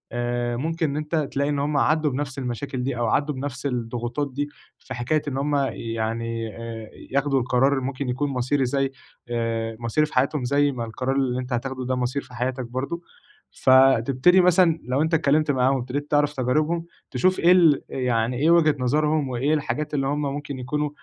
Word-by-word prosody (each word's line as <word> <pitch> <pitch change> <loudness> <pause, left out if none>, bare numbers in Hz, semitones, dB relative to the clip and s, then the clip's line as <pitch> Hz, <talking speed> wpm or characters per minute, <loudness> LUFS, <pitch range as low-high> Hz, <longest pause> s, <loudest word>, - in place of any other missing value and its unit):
آآ، 120 0 -1
ممكن 160 +3 -1
إن 140 - -3
أنت 150 +2 -3
تلاقي 145 -2 0
إن 145 -1 0
هُم 145 +1 0
عدّوا 155 0 +2
بنَفْس 135 0 -4
المشاكل 130 +1 -4
دي، 130 -2 -2
أو 120 - 0
عدّوا 145 +5 +1
بنَفْس 135 0 -5
الضغوطات 120 +2 -3
دي، 145 +2 -2 0.3
في 130 - -8
حكاية 130 +5 0
إن 135 -2 -2
هُم 145 +1 0 0.2
يعني 115 0 -3
آآ، 115 -1 -7 0.2
ياخدوا 140 0 +2
القرار 130 +2 +2
اللي 135 - -1
ممكن 135 0 -3
يكون 140 +4 -1
مصيري، 130 +1 0
زَيّ 135 +1 0 0.4
آآ، 115 -1 -2
مصيري 120 +6 +1
في - - -15
حياتهم، 135 +2 +1
زَيّ 145 +3 +2
ما 120 -3 -4
القرار 130 +4 -2
اللي 130 -2 0
أنت 125 0 -4
هتاخدوا 130 +1 -3
ده 130 - 0
مصير 125 +2 -1
في 125 - -17
حياتك 125 +2 -2
برضه، 130 +8 -4 0.5
فتبتدي 130 +6 +5
مثلًا 175 -2 +4
لو 130 +3 0
أنت 160 +1 0
اتكلمت 150 -1 +3
معاهم، 130 0 +2
وابتديت 135 +4 -4
تعرف 145 0 +3
تجاربهم، 155 +6 0 0.3
تشوف 185 0 +2
إيه 175 - +5
ال 170 -6 +5
يعني 125 -1 0
إيه 155 +5 +3
وجهة 160 -3 +5
نظرهم، 150 +3 +1
وإيه 130 +5 0
الحاجات 150 0 -2
اللي 135 -2 0
هُم 145 +2 -1
ممكن 145 -1 -4
يكونوا 150 +4 -2
135 Hz, 190 wpm, -24 LUFS, 125-150 Hz, 0.5 s, فتبتدي